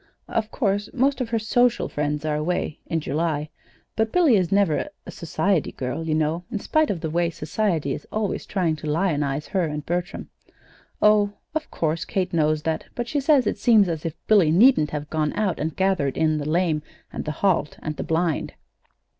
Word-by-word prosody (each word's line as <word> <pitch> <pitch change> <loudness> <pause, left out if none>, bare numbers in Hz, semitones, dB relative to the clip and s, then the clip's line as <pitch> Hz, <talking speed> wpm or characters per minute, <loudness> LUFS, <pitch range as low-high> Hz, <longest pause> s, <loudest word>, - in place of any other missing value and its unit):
"Of 220 -1 -1
course, 205 -4 -1
most 270 +1 +2
of 240 - -2
her 230 - +1
social 240 +2 +2
friends 150 +1 -2
are 155 -1 0
away 155 0 -2
in 165 -1 -1
July; 155 0 -1 0.5
but 220 0 0
Billy 330 -9 +4
is 185 -4 +1
never 195 -6 +2 0.2
a - - -8
society 170 +1 -1
girl, 135 +6 -4
you 155 - +1
know, 155 +2 0
in - - -3
spite 310 +7 +1
of 175 -5 -2
the 160 - -2
way 170 +1 +1
Society 160 -2 -1
is - - -8
always 215 -2 -2
trying 175 -5 0
to 150 0 -5
lionize 150 -4 0
her 185 -3 +1
and 150 -1 -4
Bertram." 175 +2 -3 0.7
"Oh, 210 -1 +4 0.2
of 315 0 -3
course 160 0 -1
Kate 185 -2 -2
knows 155 -2 +1
that; 160 -1 -2
but 240 -1 -3
she 290 - 0
says 280 -2 +4
it 210 - -1
seems 215 -3 +5
as 160 -3 -3
if 165 -2 -4
Billy 200 -7 +5
needn't 185 - +5
have 150 -1 -4
gone 155 -1 0
out 200 -6 -1
and 155 +1 -2
gathered 190 -8 +1
in 155 -1 +2
the 145 +1 -3
lame 165 -2 +1 0.3
and - - -4
the 155 - -2
halt 170 -6 +1
and 155 -1 -4
the - - -3
blind." 165 -1 -1
170 Hz, 195 wpm, -24 LUFS, 155-210 Hz, 0.7 s, seems